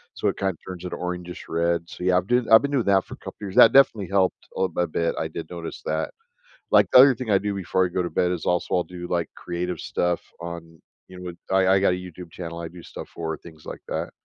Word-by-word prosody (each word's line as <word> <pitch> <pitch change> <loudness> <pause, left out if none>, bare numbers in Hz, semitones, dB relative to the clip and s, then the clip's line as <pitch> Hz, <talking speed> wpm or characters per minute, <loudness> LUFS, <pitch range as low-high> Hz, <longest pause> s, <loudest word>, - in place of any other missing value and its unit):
so, - - -1
it - - -4
kinda 95 -2 -1
turns 90 -2 -7
into - - -4
orangish 90 0 -5
red, 85 0 0
so - - -8
yeah, 90 0 +4
I'm 90 - 0
doing 125 0 +2
that 110 - +1
I've 110 - +10
been 140 - -1
doing 130 -5 +1
that 95 -1 +4
for - - -9
a - - -26
couple - - -10
years, 100 -1 -6
that 115 - +9
definitely 115 -8 +5
helped 95 -2 +1
a - - -2
little 95 -1 -1
a 85 - -1
bit, 85 +1 -1
I 80 - -1
did 80 0 -7
notice 85 -1 -7
that. 80 +1 -1 0.6
Like, - - +5
the 125 - +9
other 135 +1 +9
thing 120 -1 -6
I 100 - +6
do 100 0 -2
before 95 0 +1
I - - -2
go 90 +1 -1
to 85 - -3
bed 90 0 +1
is 85 -3 -3
also, 90 0 +1
I'll 90 - +2
do, 90 -1 -8
like, 85 -1 -1
creative 90 -1 -4
stuff 90 -1 -1 0.2
on, 85 -2 -8 0.3
you 90 - -11
know 90 -1 -6 0.2
I 95 -1 +4
I 95 - +4
got 100 - +4
a - - -2
YouTube 90 -2 -10
channel 85 -1 -7
I 85 - -5
do 90 0 -12
stuff - - -9
for, 80 -1 -4
things 80 -3 -15
like - - -8
that. - - -3
90 Hz, 275 wpm, -24 LUFS, 85-95 Hz, 0.6 s, I've